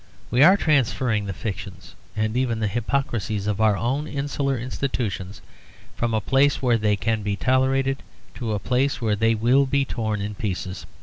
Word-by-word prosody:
We 125 Hz, -, +3 dB
are 185 Hz, +7 st, +8 dB
transferring 130 Hz, -, +1 dB
the 100 Hz, -, -3 dB
fictions 95 Hz, -1 st, -7 dB, 0.2 s
and 110 Hz, +1 st, -1 dB
even 125 Hz, -3 st, 0 dB
the 110 Hz, -, 0 dB
hypocrisies 110 Hz, -3 st, -2 dB
of 105 Hz, 0 st, -1 dB
our 110 Hz, -2 st, +4 dB
own 135 Hz, +8 st, -1 dB
insular 140 Hz, -1 st, -2 dB
institutions 115 Hz, -6 st, -4 dB, 0.5 s
from 115 Hz, -1 st, -1 dB
a -, -, +2 dB
place 135 Hz, +6 st, +3 dB
where 120 Hz, -3 st, +2 dB
they 105 Hz, -1 st, +2 dB
can 110 Hz, +2 st, -1 dB
be 100 Hz, -1 st, -1 dB
tolerated 135 Hz, +3 st, +1 dB, 0.3 s
to 115 Hz, -4 st, -3 dB
a -, -, 0 dB
place 125 Hz, +5 st, 0 dB
where 110 Hz, -3 st, +1 dB
they 115 Hz, +2 st, +2 dB
will 125 Hz, +5 st, +3 dB
be 140 Hz, +1 st, +1 dB
torn 110 Hz, -4 st, -2 dB
in 105 Hz, +1 st, -3 dB
pieces. 95 Hz, -2 st, -4 dB
115 Hz, 175 wpm, -23 LUFS, 105-135 Hz, 0.5 s, are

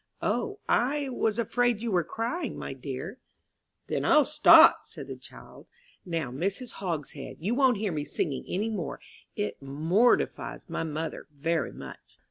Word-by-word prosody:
"O, 410 Hz, -, -1 dB
I 280 Hz, +3 st, +1 dB
was 225 Hz, -3 st, 0 dB
afraid 240 Hz, 0 st, +1 dB
you 235 Hz, -, -1 dB
were 180 Hz, -3 st, +2 dB
crying, 235 Hz, -, -3 dB
my -, -, -5 dB
dear." 135 Hz, -, -6 dB, 0.7 s
"Then -, -, -2 dB
I'll 300 Hz, -2 st, +5 dB
stop," 300 Hz, -, +7 dB
said -, -, -9 dB
the -, -, -7 dB
child. -, -, -14 dB, 0.4 s
"Now, 165 Hz, -8 st, -3 dB
Mrs. 195 Hz, -, -3 dB
Hogshead, 155 Hz, -7 st, -5 dB
you 195 Hz, +9 st, -1 dB
won't 255 Hz, -3 st, +3 dB
hear 205 Hz, -1 st, -1 dB
me 150 Hz, -3 st, -2 dB
singing 145 Hz, -1 st, -2 dB
any 210 Hz, +5 st, -1 dB
more, 180 Hz, -9 st, -4 dB, 0.4 s
it 105 Hz, +5 st, -3 dB
mortifies 160 Hz, -, +1 dB
my -, -, -3 dB
mother 160 Hz, 0 st, -4 dB
very 160 Hz, +3 st, -1 dB
much." -, -, -12 dB
190 Hz, 150 wpm, -28 LUFS, 155-240 Hz, 0.7 s, stop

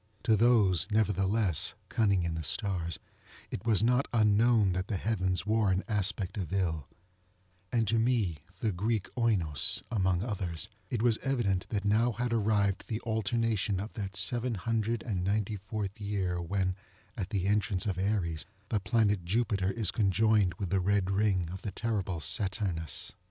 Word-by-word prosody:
To 110 Hz, -, +4 dB
those, 105 Hz, -6 st, +4 dB
nevertheless, 100 Hz, -3 st, +1 dB
cunning 100 Hz, -5 st, +2 dB
in 85 Hz, -1 st, -1 dB
the 80 Hz, -, -3 dB
stars, 85 Hz, +5 st, -2 dB, 0.5 s
it 100 Hz, -, -5 dB
was 110 Hz, -2 st, +3 dB
not 125 Hz, +4 st, +3 dB
unknown 110 Hz, -2 st, +4 dB
that 95 Hz, +1 st, -2 dB
the 105 Hz, -, -1 dB
heavens 95 Hz, -3 st, -1 dB
wore 110 Hz, -1 st, +2 dB
an 95 Hz, +1 st, +1 dB
aspect 100 Hz, -2 st, -1 dB
of 90 Hz, -3 st, -4 dB
ill; 85 Hz, -7 st, -1 dB, 0.8 s
and 115 Hz, -2 st, +1 dB
to 115 Hz, +2 st, +2 dB
me, 110 Hz, -9 st, +1 dB, 0.2 s
the 110 Hz, -, +1 dB
Greek 105 Hz, +3 st, -1 dB
Oinos, 100 Hz, -, +2 dB
among 95 Hz, -4 st, +1 dB
others, 95 Hz, -4 st, -3 dB, 0.2 s
it 115 Hz, -2 st, -1 dB
was 115 Hz, -2 st, +3 dB
evident 115 Hz, -9 st, 0 dB
that 105 Hz, -2 st, -2 dB
now 115 Hz, +4 st, +3 dB
had 120 Hz, +2 st, -2 dB
arrived 105 Hz, -3 st, +1 dB
the 110 Hz, -, -2 dB
alternation 110 Hz, -3 st, 0 dB
of 105 Hz, +3 st, -6 dB
that 100 Hz, -2 st, -5 dB
seven 120 Hz, +5 st, 0 dB
hundred 115 Hz, +2 st, -1 dB
and 95 Hz, -6 st, -2 dB
ninety 105 Hz, +2 st, 0 dB
fourth 100 Hz, +1 st, -5 dB
year 95 Hz, -4 st, -1 dB
when, 95 Hz, +1 st, -1 dB, 0.4 s
at 100 Hz, -6 st, -4 dB
the 95 Hz, -4 st, -1 dB
entrance 100 Hz, -1 st, +1 dB
of 95 Hz, -3 st, -1 dB
Aries, 95 Hz, -6 st, -1 dB, 0.2 s
the 110 Hz, -, +1 dB
planet 105 Hz, -3 st, +1 dB
Jupiter 100 Hz, 0 st, 0 dB
is 105 Hz, -2 st, +1 dB
conjoined 105 Hz, -1 st, +2 dB
with 95 Hz, -5 st, -4 dB
the 95 Hz, -, +3 dB
red 100 Hz, 0 st, +1 dB
ring 95 Hz, -3 st, +1 dB
of 95 Hz, -, -7 dB
the 105 Hz, -, -4 dB
terrible 100 Hz, -7 st, -2 dB
Saturnus. 90 Hz, -1 st, -1 dB
100 Hz, 160 wpm, -30 LUFS, 95-110 Hz, 0.8 s, To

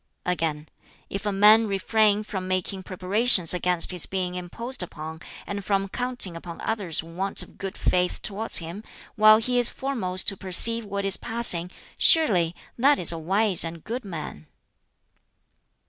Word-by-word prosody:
Again, 160 Hz, -4 st, -2 dB, 0.4 s
"If 200 Hz, +1 st, -5 dB
a -, -, 0 dB
man 210 Hz, +3 st, +5 dB
refrain 210 Hz, +1 st, +1 dB
from 190 Hz, -3 st, -6 dB
making 185 Hz, +1 st, -2 dB
preparations 185 Hz, 0 st, +2 dB
against 180 Hz, -1 st, +1 dB
his 180 Hz, -3 st, -1 dB
being 185 Hz, -2 st, -3 dB
imposed 190 Hz, +8 st, -5 dB
upon, 160 Hz, -2 st, -7 dB, 0.2 s
and 200 Hz, 0 st, -6 dB
from 195 Hz, 0 st, -1 dB
counting 245 Hz, -6 st, 0 dB
upon 165 Hz, 0 st, -9 dB
others' 195 Hz, -9 st, -2 dB
want 180 Hz, +4 st, -4 dB
of -, -, -19 dB
good 195 Hz, +1 st, -6 dB
faith 180 Hz, 0 st, 0 dB
towards 215 Hz, +2 st, +1 dB
him, 170 Hz, +5 st, -6 dB, 0.3 s
while 215 Hz, -1 st, +6 dB
he 245 Hz, +2 st, 0 dB
is 240 Hz, -, +3 dB
foremost 205 Hz, -10 st, -1 dB
to 195 Hz, -, -6 dB
perceive 225 Hz, +5 st, +4 dB
what 200 Hz, 0 st, -4 dB
is 195 Hz, -1 st, +3 dB
passing 225 Hz, -7 st, 0 dB, 0.3 s
surely 180 Hz, -, +4 dB, 0.2 s
that 280 Hz, +3 st, +4 dB
is 170 Hz, -, +4 dB
a 165 Hz, -, -5 dB
wise 195 Hz, +4 st, +1 dB
and 165 Hz, -1 st, -8 dB
good 245 Hz, +3 st, -5 dB
man." 155 Hz, -, -8 dB
195 Hz, 155 wpm, -24 LUFS, 175-215 Hz, 0.4 s, while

